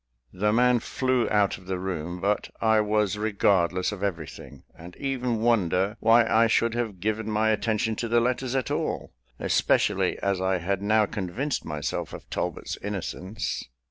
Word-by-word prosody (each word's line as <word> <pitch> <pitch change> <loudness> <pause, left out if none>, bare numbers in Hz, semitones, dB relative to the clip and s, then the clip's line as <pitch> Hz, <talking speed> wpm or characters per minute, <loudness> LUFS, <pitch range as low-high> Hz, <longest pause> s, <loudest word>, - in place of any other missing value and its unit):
The 105 +3 +1
man 125 +2 +4
flew 130 0 0
out 105 -2 +2
of 90 - -18
the 95 -1 -2
room; 90 -2 -4
but 100 +3 0
I 110 -1 +4
was 105 -1 +1
regardless 95 -4 +2
of 105 -2 -7
everything, 80 -10 -5
and 85 +2 -12
even 125 -5 -2
wonder 100 -3 +2
why 115 +1 +5
I 115 +1 +4
should 115 0 +2
have 115 -6 -3
given 110 +3 -1
my 110 +1 +2
attention 110 +1 0
to 120 - -2
the 120 +1 +3
letters 125 +2 -1
at 130 -3 -1
all, - - -2 0.3
especially - - +2
as 100 -2 -1
I 95 0 +1
had 95 +3 -2
now 110 +1 +3
convinced 105 +10 -3
myself 75 -3 -3
of - - -9
Talbot's - - -3
innocence. 100 0 -4
105 Hz, 165 wpm, -26 LUFS, 95-115 Hz, 0.3 s, why